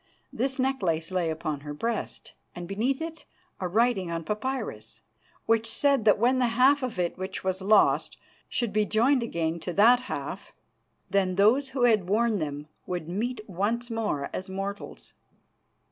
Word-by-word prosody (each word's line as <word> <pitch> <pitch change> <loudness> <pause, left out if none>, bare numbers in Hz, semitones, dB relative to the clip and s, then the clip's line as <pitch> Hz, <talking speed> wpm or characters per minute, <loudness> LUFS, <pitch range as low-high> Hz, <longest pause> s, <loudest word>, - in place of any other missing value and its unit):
This 260 +3 -1
necklace 190 -12 0
lay 180 -3 0
upon 155 -2 -3
her 145 +1 -7
breast, 230 +9 -4 0.2
and 175 0 -6
beneath 245 - -1
it 325 0 -7 0.3
a 185 - -2
writing 210 -1 +1
on 165 0 -3
papyrus, 255 +9 -4 0.4
which 225 0 +2
said 275 0 +2
that 210 - +6
when 250 +4 +3
the 250 - +3
half 275 +3 +5
of 250 -6 -4
it 175 0 -2
which 190 0 -4
was 190 0 -1
lost 205 +1 +3 0.3
should 235 -5 -1
be 215 0 +3
joined 235 +6 +2
again 170 -7 -2
to 175 +2 -5
that 235 +6 +6
half, - - -5 0.6
then 190 -2 +2
those 235 +8 +4
who 250 - +2
had 215 -7 +3
worn 220 0 +2
them 145 -1 -4 0.2
would 175 -3 -4
meet 215 +6 -3
once 220 +6 -2
more 215 -11 -2
as 190 +1 -5
mortals. 195 +2 -6
210 Hz, 160 wpm, -27 LUFS, 180-245 Hz, 0.6 s, that